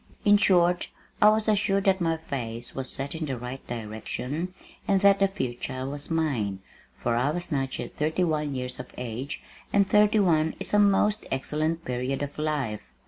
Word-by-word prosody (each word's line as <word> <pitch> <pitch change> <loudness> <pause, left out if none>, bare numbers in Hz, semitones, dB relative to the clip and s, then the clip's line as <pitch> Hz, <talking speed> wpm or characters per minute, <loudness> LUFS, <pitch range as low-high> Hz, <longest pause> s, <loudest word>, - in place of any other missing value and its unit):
In 205 0 +7
short, 180 -3 +3 0.3
I 210 - +9
was 215 0 +2
assured 200 -2 +2
that 190 -1 +3
my 165 -1 +1
face 120 -7 -5
was 135 -1 -4
set 140 +1 -3
in 160 -1 -3
the 135 -2 -2
right 125 +2 -6
direction 120 +8 -4 0.4
and 195 - +4
that 200 -1 +6
the 195 - +5
future 130 -7 -4
was 145 +1 -4
mine, 135 - 0 0.4
for 120 -1 0
I 125 +4 +2
was 175 +3 -3
not 135 -2 -1
yet 120 - -7
thirty 160 +4 +1
one 150 -4 0
years 125 -1 -4
of 125 - -6
age, 125 +3 -5 0.3
and 200 -1 +4
thirty 210 +1 +4
one 160 -5 +3
is - - -4
a 210 - +6
most 205 +1 +3
excellent 155 +5 -1
period 125 +3 -2
of 145 +1 -6
life! 145 -9 -1
150 Hz, 185 wpm, -27 LUFS, 125-185 Hz, 0.4 s, I